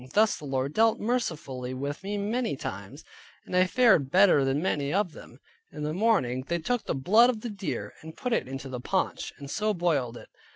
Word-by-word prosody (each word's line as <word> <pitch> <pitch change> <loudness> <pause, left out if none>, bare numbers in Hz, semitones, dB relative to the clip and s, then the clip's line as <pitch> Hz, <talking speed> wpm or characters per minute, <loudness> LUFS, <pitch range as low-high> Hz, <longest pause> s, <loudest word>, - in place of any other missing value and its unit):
Thus 215 +1 +4
the 150 - -10
Lord 135 +1 -2
dealt 225 0 +3
mercifully 155 - -2
with 140 +2 -4
me 205 +1 -3
many 220 - -1
times, 100 +5 -7 0.4
and - - -5
I 185 0 +4
fared 220 - +4
better 185 -4 +5
than 135 +1 +1
many 145 -5 -1
of 195 0 +1
them. - - -14 0.3
In 150 - -6
the 150 +1 -2
morning 175 - +1
they 170 - 0
took 240 +8 -2
the - - -1
blood 215 - +5
of 225 -4 -2
the 235 - -5
deer, 200 -2 -4
and 160 +1 -11
put 250 -2 -2
it - - 0
into 135 +1 -6
the 130 -2 -5
paunch, - - -1
and 140 - -9
so 215 0 0
boiled 145 -9 0
it. - - -13
170 Hz, 210 wpm, -27 LUFS, 135-215 Hz, 0.4 s, better